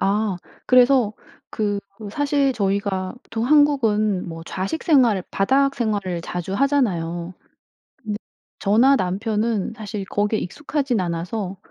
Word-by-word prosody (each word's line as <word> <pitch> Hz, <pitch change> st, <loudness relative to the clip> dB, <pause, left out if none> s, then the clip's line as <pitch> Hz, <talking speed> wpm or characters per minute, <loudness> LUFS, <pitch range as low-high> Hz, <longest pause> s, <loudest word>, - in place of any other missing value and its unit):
아 200 Hz, -1 st, +1 dB, 0.3 s
그래서 250 Hz, -3 st, +5 dB, 0.4 s
그 205 Hz, -2 st, -1 dB, 0.3 s
사실 285 Hz, -2 st, +1 dB
저희가 195 Hz, -3 st, -1 dB
보통 225 Hz, 0 st, -4 dB
한국은 225 Hz, -, +3 dB
뭐 165 Hz, 0 st, -7 dB
좌식 195 Hz, -, -3 dB
생활을 240 Hz, -, +4 dB
바닥 270 Hz, +7 st, +2 dB
생활을 200 Hz, -7 st, -1 dB
자주 175 Hz, +3 st, -4 dB
하잖아요. 185 Hz, -, 0 dB, 0.6 s
근데 215 Hz, -5 st, -5 dB, 0.4 s
저나 235 Hz, +7 st, +4 dB
남편은 210 Hz, +3 st, -1 dB
사실 210 Hz, -3 st, -5 dB
거기에 205 Hz, +2 st, 0 dB
익숙하지는 270 Hz, -, -2 dB
않아서 180 Hz, +3 st, -3 dB
210 Hz, 265 characters per minute, -22 LUFS, 190-255 Hz, 0.6 s, 그래서